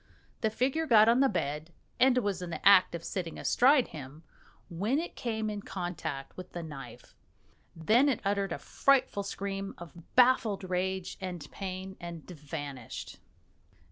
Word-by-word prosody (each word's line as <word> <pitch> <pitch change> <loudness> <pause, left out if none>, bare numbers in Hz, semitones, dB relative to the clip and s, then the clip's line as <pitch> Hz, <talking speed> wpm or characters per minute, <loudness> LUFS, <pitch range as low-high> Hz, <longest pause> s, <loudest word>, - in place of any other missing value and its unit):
The 220 - +1
figure 265 +8 0
got 220 -4 +7
on 235 +2 +5
the 270 0 +5
bed 150 - -3 0.3
and 255 0 +5
was 200 -6 0
in 180 - -5
the 170 - -1
act 190 -3 +7
of 170 - -6
sitting 170 -3 -4
astride 260 0 +4
him, 150 +2 -10 0.4
when 205 +10 -1
it 335 +3 -4
came 220 -2 -2
in 210 -1 -3
contact 175 -8 -5
with 185 -1 -10
the 175 - -5
knife. 145 -4 -10 0.6
Then 220 - +4
it 260 - 0
uttered 200 -1 0
a - - -2
frightful 265 -7 +2
scream 195 0 -4
of 170 -1 -13
baffled 240 -5 +4
rage 185 0 -2
and 175 -5 -5
pain, 190 0 -6
and 170 -3 -8
vanished. 145 -6 -7
190 Hz, 155 wpm, -30 LUFS, 170-220 Hz, 0.6 s, got